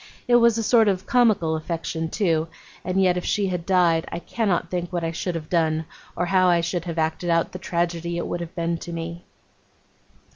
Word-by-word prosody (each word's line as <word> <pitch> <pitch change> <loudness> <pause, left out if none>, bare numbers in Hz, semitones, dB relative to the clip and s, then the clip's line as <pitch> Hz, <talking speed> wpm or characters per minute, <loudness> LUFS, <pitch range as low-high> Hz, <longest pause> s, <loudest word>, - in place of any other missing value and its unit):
It 240 -1 +6
was 235 -1 +4
a 225 - -1
sort 225 0 +4
of 190 -1 0
comical 220 -11 +3
affection, 160 0 -3
too; 165 -6 +1 0.4
and 185 +1 -1
yet 180 -2 +3
if 180 - -2
she 200 -2 0
had 180 -2 -4
died, 175 -4 +3
I - - -3
cannot 175 -2 -1
think 175 -1 -3
what 175 -2 -2
I 165 - -1
should 170 +1 -3
have 155 -2 -5
done, 160 -2 +1 0.3
or 175 - 0
how 185 0 +3
I 175 -1 +4
should 170 0 -2
have 170 -1 -5
acted 160 +2 -1
out 165 0 +2
the 185 - -7
tragedy 170 -1 -2
it 170 - -2
would 175 - -3
have 170 -1 -7
been 170 -1 -1
to 175 - -8
me. 170 +1 -6
175 Hz, 215 wpm, -24 LUFS, 165-185 Hz, 0.4 s, It